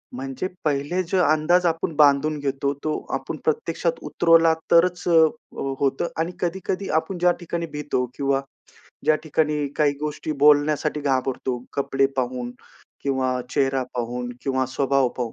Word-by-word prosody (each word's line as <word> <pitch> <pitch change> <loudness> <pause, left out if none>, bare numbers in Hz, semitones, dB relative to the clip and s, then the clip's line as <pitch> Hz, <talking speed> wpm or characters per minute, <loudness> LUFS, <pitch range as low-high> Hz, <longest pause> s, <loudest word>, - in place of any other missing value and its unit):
म्हणजे 135 +6 -4 0.2
पहिले 145 +5 0
जो 185 +3 -1
अंदाज 155 +4 +3
आपण 165 -1 -1
बांधून 150 +1 +4
घेतो, 140 0 -1
तो 155 -1 -1 0.2
आपण - - -5
प्रत्यक्षात 465 +2 -1
उतरवला 165 -1 +4 0.2
तरच 180 +1 +4
अ, - - +2 0.5
अ, 135 0 -2
होतं. 135 +4 0
आणि 165 +2 0
कधी-कधी 185 +2 -2
आपण 175 +3 -7
ज्या 180 0 +4
ठिकाणी 170 0 -3
भीतो 145 -4 -1
किंवा 140 -1 0 0.6
ज्या 155 - +5
ठिकाणी 150 -1 0
काही 145 -2 +3
गोष्टी 150 +1 -3
बोलण्यासाठी 150 0 +4
घाबरतो 130 -2 -1
कपडे 135 -1 +1
पाहून 125 -1 -2 0.5
किंवा 130 -2 0
चेहरा 135 -1 +1
पाहून 120 0 -3
किंवा 130 -1 0
स्वभाव 135 0 +1
पाहून, 120 -3 -3
145 Hz, 140 wpm, -23 LUFS, 135-165 Hz, 0.6 s, ज्या